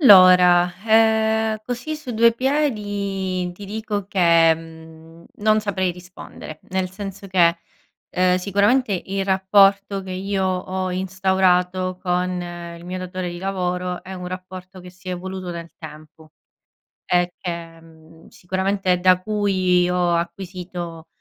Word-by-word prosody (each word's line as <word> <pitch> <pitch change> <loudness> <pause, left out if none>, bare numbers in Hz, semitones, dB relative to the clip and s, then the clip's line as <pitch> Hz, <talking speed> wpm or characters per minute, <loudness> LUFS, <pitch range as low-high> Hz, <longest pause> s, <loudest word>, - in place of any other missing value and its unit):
Allora, 180 - +7
eh, 220 0 +3
così 250 +6 -4
su 300 -4 -8
due 230 +1 +5
piedi 205 -9 -1
ti 200 +3 -11
dico 210 -1 -4
che, 170 -4 +5
mhmm, 160 0 -14
non 215 +1 +2
saprei 190 -3 -1
rispondere. 180 -3 -11
Nel 185 -1 -1
senso 195 0 -8
che, 170 -2 +3 0.5
ehm, 180 0 +2
sicuramente 200 +2 +1
il 195 0 -2
rapporto 195 +1 +3
che 190 - -9
io 190 +1 -2
ho 185 0 -2
instaurato 185 -1 +1
con 180 0 0 0.5
il 170 - -13
mio 180 +1 -5
datore 185 0 -5
di 175 - -7
lavoro 180 -1 -3
è 190 +1 -9
un 180 -1 -7
rapporto 185 +1 -8
che 180 0 -11
si 180 +2 -23
è - - -2
evoluto 185 0 -6
nel 170 0 -8
tempo 155 0 -13 0.7
e 175 0 +1
che 170 -2 -6
mhmm, 160 0 -18
sicuramente 190 0 -1
da 185 0 +4
cui 185 -4 +1
ho 180 -1 +1
acquisito, 175 -1 -5
185 Hz, 135 wpm, -21 LUFS, 180-200 Hz, 0.7 s, Allora